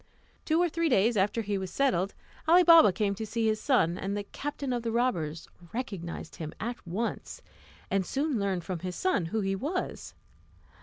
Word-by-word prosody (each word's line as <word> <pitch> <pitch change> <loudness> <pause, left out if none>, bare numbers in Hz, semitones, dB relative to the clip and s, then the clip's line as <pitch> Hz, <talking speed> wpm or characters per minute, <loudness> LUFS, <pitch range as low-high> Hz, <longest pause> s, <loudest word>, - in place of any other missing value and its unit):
Two 320 +1 +2
or 350 - +4
three 335 0 0
days 230 -1 +3
after 210 +3 +1
he 205 -1 -1
was 190 -1 -4
settled, 195 -8 +1 0.3
Ali 350 +3 +7
Baba 330 - +8
came 200 +1 0
to 200 - -5
see 225 +1 -1
his 215 -1 +1
son, 180 - +2
and 200 +1 -2
the 205 - -3
captain 280 +4 -4
of 240 - -1
the 230 0 -2
robbers 170 -10 -1 0.3
recognised 195 -10 -5
him 155 -2 -6
at 240 +3 -3
once, 230 - -4 0.5
and 195 -1 +2
soon 275 - -1
learned 195 -3 -1
from 180 0 -4
his 180 +1 -5
son 370 - +1
who 215 +7 -1
he 195 0 0
was. 310 - -4
215 Hz, 190 wpm, -29 LUFS, 190-270 Hz, 0.5 s, Baba